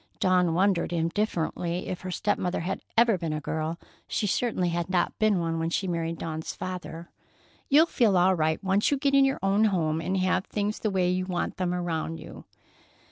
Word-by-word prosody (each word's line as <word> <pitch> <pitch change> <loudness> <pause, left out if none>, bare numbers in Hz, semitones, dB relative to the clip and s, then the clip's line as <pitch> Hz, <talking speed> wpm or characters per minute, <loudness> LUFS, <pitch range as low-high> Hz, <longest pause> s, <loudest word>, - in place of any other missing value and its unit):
Dawn 180 -3 +3
wondered 185 -2 +2
indifferently 170 0 -1
if 180 - -4
her 185 - -6
step 205 +3 -1
mother 180 -2 -1
had 190 +3 -3 0.2
ever 230 -4 +4
been 165 -2 -2
a 155 - -2
girl. 160 +2 -3 0.3
She - - -1
certainly 200 -3 0
had 170 +1 -2
not 180 -2 0
been 215 -3 +3
one 165 -1 -1
when 165 0 -1
she 190 +3 -1
married 165 -1 -2
Dawn's 160 -1 -5
father. 175 -2 -6 0.6
"You'll 300 +4 +6
feel 230 - +2
all 185 +2 +4
right 160 -1 0
once 195 +2 +2
you 285 - +1
get 275 0 0
in 275 0 +6
your 270 0 +1
own 200 +3 +3
home 165 -6 +1
and 185 +4 -1
have 185 0 +1
things 210 0 -2
the 215 - -1
way 185 -2 +1
you 185 0 -1
want 180 -2 -2
them 180 -2 -1
around 165 -2 -2
you." - - -11
180 Hz, 200 wpm, -27 LUFS, 165-200 Hz, 0.6 s, You'll